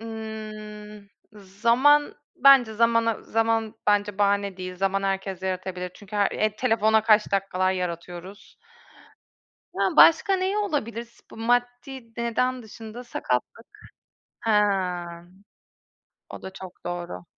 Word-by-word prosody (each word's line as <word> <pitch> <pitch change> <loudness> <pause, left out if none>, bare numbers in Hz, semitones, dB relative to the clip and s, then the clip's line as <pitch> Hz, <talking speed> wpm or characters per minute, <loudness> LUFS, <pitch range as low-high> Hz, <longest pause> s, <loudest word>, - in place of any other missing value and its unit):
Imm, 215 -2 -8 0.3
zaman. 235 +9 +2 0.2
Bence 265 -6 +6
zamana 230 0 +2
zaman 225 0 0
bence 205 -1 +1
bahane 200 -1 +1
değil. 185 0 -7
Zaman 195 +1 0
herkes 195 -1 -3
yaratabilir. 185 -1 -4
Çünkü 205 0 -9
her 200 -1 +2
eee, 215 0 -1
telefona 220 -3 +2
kaç 215 -2 +3
dakikalar 185 -1 +1
yaratıyoruz. 180 +2 -6 1.2
Yani, - - -1
başka 335 +4 +6
neyi 380 +2 -1
olabilir 255 - -2
sp - - -27
maddi 245 +1 -2
neden 245 +2 -1
dışında 225 +2 -10
sakatlık. 175 - -3 0.7
He, 225 - -1 1.8
o - - -9
da 190 - -8
çok 185 -1 -11
doğru. 175 - -5
215 Hz, 110 wpm, -25 LUFS, 195-235 Hz, 1.8 s, Bence